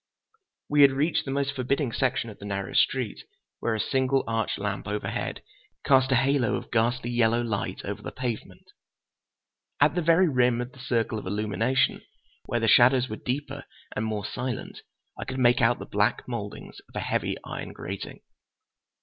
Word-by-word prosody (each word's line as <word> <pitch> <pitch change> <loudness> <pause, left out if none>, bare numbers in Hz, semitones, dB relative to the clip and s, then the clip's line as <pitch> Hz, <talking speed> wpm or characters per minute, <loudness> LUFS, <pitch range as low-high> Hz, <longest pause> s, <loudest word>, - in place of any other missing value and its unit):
We 145 0 +4
had 140 -1 +8
reached 150 +5 +1
the - - -5
most 140 0 0
forbidding 135 0 0
section 125 -2 0
of 105 - -14
the 100 - -9
narrow 100 -2 -3
street, - - +1 0.4
where 115 - 0
a - - -3
single 130 +3 +1
arch 115 -1 -1
lamp 100 -1 -3
overhead 105 +1 -3 0.4
cast 130 -1 +4
a - - +5
halo 130 -4 +2
of - - -6
ghastly 120 +1 +1
yellow 120 0 +2
light 110 -4 -3
over - - -4
the - - -6
pavement. 125 -3 -5 1.1
At 145 0 +5
the 175 - 0
very 170 +3 +5
rim 125 -4 +3
of 125 +1 -4
the 130 - -17
circle 115 -3 -1
of 100 - -8
illumination, 105 +6 +1 0.4
where 120 - -1
the 115 - +1
shadows 125 +3 +6
were 110 - -4
deeper 140 +2 -4 0.3
and 110 - -1
more 110 -2 -2
silent, 125 -2 -4 0.4
I - - -2
could 130 - -5
make 120 0 +4
out 120 +1 +4
the - - -7
black 105 +1 0
mouldings 110 -5 -6
of - - -20
a - - -1
heavy - - -1
iron - - -6
grating. 95 +1 -7
120 Hz, 175 wpm, -27 LUFS, 110-135 Hz, 1.1 s, had